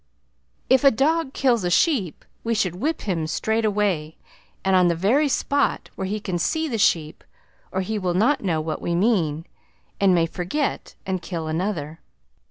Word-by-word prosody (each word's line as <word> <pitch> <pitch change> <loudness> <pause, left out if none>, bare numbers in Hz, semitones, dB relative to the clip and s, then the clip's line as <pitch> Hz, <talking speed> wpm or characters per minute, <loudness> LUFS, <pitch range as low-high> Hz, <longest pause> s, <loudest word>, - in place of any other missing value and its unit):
If 260 0 +4
a 275 - +8
dog 290 +4 +1
kills 245 -6 +1
a 175 - 0
sheep 200 - +1 0.2
we 230 0 0
should 180 -4 0
whip 310 - -1
him 170 -6 -2
straight 220 +7 0
away, 195 -7 0 0.5
and 190 0 +3
on 180 -1 +5
the 170 - +2
very 245 - +2
spot 280 +1 0
where 190 - -4
he 210 +2 -2
can 185 -4 -3
see 320 - 0
the 230 -6 -3
sheep, 160 -5 +1 0.5
or 190 - -1
he 215 +3 -2
will 180 -2 -1
not 245 +10 +2
know 170 -6 0
what 155 0 -4
we 170 - -1
mean, 170 -6 +1 0.5
and 195 -2 +4
may 165 -1 +3
forget 185 - -3
and 185 -2 -2
kill 170 -2 -5
another. 160 -2 -3
190 Hz, 180 wpm, -23 LUFS, 170-235 Hz, 0.5 s, a